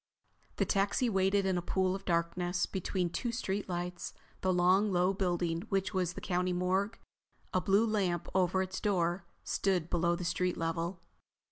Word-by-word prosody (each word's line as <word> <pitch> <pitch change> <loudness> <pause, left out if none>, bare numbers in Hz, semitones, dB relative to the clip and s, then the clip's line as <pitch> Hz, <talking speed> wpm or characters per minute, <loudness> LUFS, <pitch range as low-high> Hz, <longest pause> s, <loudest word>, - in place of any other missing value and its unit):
The - - +1
taxi 200 +5 +1
waited 195 0 +2
in 185 -2 +1
a - - -4
pool 185 +1 +1
of 195 0 -6
darkness 175 +1 0
between 185 -2 -2
two 240 +6 -2
street 205 -4 -2
lights. 175 0 -4 0.3
The 185 - +2
long, 185 +3 +4
low 180 +1 +3
building 175 -3 0
which 195 0 0
was 180 -2 0
the - - -7
County 180 0 0
morgue, 190 +4 0 0.6
a 185 - +2
blue 200 +3 +4
lamp 190 -6 0
over 190 0 +2
its 185 0 -5
door, 175 -3 0 0.2
stood 180 -4 0
below 170 0 +2
the 175 - -5
street 180 +1 0
level. 165 +1 -2
185 Hz, 165 wpm, -32 LUFS, 175-195 Hz, 0.6 s, long